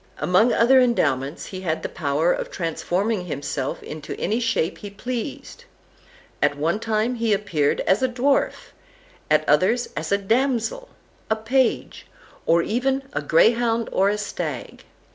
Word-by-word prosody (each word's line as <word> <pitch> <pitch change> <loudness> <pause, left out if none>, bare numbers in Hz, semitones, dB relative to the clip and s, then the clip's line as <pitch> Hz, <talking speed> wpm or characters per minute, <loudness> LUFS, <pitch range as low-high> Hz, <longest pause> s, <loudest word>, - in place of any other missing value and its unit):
Among 215 +7 +3
other 255 +4 +5
endowments, 140 - 0
he 185 -1 -7
had 160 -4 -2
the - - -1
power 155 +3 0
of - - -4
transforming 180 +4 -2
himself 140 -2 -4
into 150 -1 -7
any 220 +3 0
shape 215 -7 -1
he 205 - -7
pleased. 250 - -6 0.8
At 145 - +2
one 165 +7 0
time 225 +2 0
he 230 -3 +1
appeared 170 -8 0
as 190 +5 +2
a 260 - +2
dwarf, 265 +3 0 0.6
at - - +3
others 235 +6 +2
as 155 +3 -4
a 200 - +4
damsel, 255 - 0 0.4
a 220 - +3
page, 235 +3 0 0.4
or 170 +1 +4
even 265 +6 0
a - - -1
greyhound 230 +6 +3
or 195 +1 +3
a 210 - 0
stag. 210 -1 -5
215 Hz, 145 wpm, -23 LUFS, 170-240 Hz, 0.8 s, other